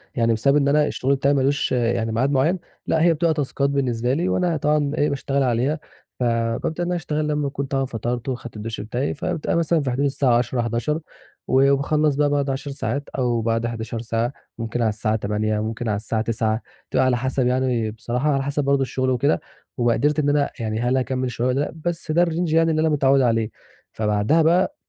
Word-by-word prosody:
يعني 115 -1 +2
بسبب 140 +6 +2
إن 140 -1 +2
أنا 150 +1 +3
الشغل 135 +2 0
بتاعي 140 +1 +2
ما 140 - +2
لوش 140 +1 +1
آآ، 120 -1 +2
يعني 115 0 -1
ميعاد 130 +5 +1
معيّن، 155 +7 +2 0.3
لأ 160 - +2
هي 170 0 +5
بتبقى 165 +1 +1
تاسكات 140 -2 -1
بالنسبه 125 -3 0
لي 170 +6 0
وأنا 175 -3 +1
طبعًا 150 -1 +1
إيه 150 - +2
باشتغل 140 0 -1
عليها، 130 +5 +1 0.4
ف - - 0
بابدأ 115 +8 0
إن 175 - -2
أنا 180 - 0
أشتغل 155 -2 -2
لمّا 150 -1 0
أكون 140 0 -3
طبعًا 135 0 -1
فَطَرت 120 0 -3
وخدت 120 -2 -5
الدُشّ 110 +1 -5
بتاعي 120 +6 -2
فبتبقي 150 +2 -2
مثلًا 165 -1 +2
في 130 - -1
حدود 140 +3 0
الساعة 135 -3 +2
10:00 120 0 0
11:00 120 +7 -1 0.5
و 135 +2 +4
وباخلّص 150 +1 +2
بقى 145 0 +2
بعد 145 -1 0
10 140 +1 -3
ساعات 140 0 -3
أو 120 -3 +1
بعد 115 +1 0
11 115 0 -4
ساعة، 115 +2 -1 0.2
ممكن 115 +1 -3
على 110 - +3
الساعة 110 +1 0
20:00 105 0 -1
ممكن 110 +1 -3
على 105 - +1
الساعة 110 +1 -1
21:00 110 0 0 0.3
بتبقى 130 0 +2
على 125 -1 +2
حسب 130 0 0
يعني 125 -3 0
بصراحة 125 +6 -1
على 135 -1 0
حسب 145 +1 -1
برضه 140 0 +2
الشغل 130 0 -1
وكده، 135 +4 +2 0.4
ومقدرتي 140 +6 +2
إن 145 - +1
أنا 145 -1 +2
يعني 110 -1 -2
هل 125 +2 +1
هاكمّل 130 0 -1
الشغل 125 +1 -1
ده؟ 145 +2 -1
بس 170 -2 -2
ده 175 +2 +4
الrange 170 -1 -1
يعني 165 0 +4
اللي 155 0 +1
أنا 160 - +3
متعود 140 -2 +3
عليه، 115 -3 +1 0.4
فبعدها 105 +9 +2
بقى 180 - +3
135 Hz, 210 wpm, -22 LUFS, 115-145 Hz, 0.5 s, هي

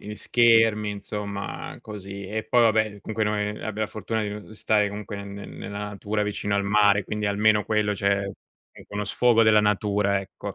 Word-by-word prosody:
gli 105 +1 -8
schermi, 115 -3 +3
insomma, 100 0 -6
così. 100 -2 -8
E 110 +3 -3
poi, 120 +3 +3
vabbè, 110 -2 +2
comunque, 110 +1 -3
noi 105 -1 0
abbiamo 105 0 -6
la - - 0
fortuna 110 +1 -3
di 105 - -2
n 105 +1 -8
stare 105 -1 +1
comunque 105 +1 -7
ne 100 0 -6
ne 100 0 -8
nella 100 0 -7
natura 105 +1 -2
vicino 105 0 -2
al 100 - 0
mare, 100 -1 +4
quindi 105 +1 -3
almeno 105 +1 +3
quello, 105 -1 +1
cioè, 100 0 0 0.4
è - - -14
uno 105 0 -3
sfogo 115 +2 +3
della 105 -1 +6
natura 105 -1 +1
ecco. 100 +1 -7
105 Hz, 190 wpm, -25 LUFS, 100-110 Hz, 0.4 s, della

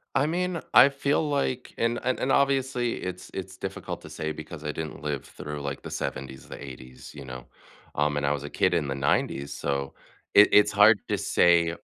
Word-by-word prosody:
I 135 - +3
mean, 175 +2 -1
I 140 - +9
feel 140 +2 0
like 140 -3 -2
and 115 +1 0
and, 130 +1 0
obviously, 135 -3 +2
it's 90 0 -6
it's 95 0 -6
difficult - - -6
to - - -11
say 80 0 -4
because 80 0 -8
I 75 - -2
didn't 80 0 -6
live 75 -3 -3
through, 75 0 -7
like, 70 -1 -4
the - - -7
'70s 65 0 -5
or - - -19
the - - -8
'80s, 65 -2 -11
you 70 -2 -9
know? 65 -2 -8 0.5
Um, 75 0 +1
and 75 - 0
I 70 - +2
was 70 -1 -2
a 75 - -6
kid - - +1
in 80 -4 +1
the 70 - -2
'90s, 70 0 0
so 70 -1 -3 0.4
it 105 - +8
it's 105 - +6
hard - - +6
to - - +1
say 85 -1 +3
80 Hz, 205 wpm, -26 LUFS, -, 0.5 s, I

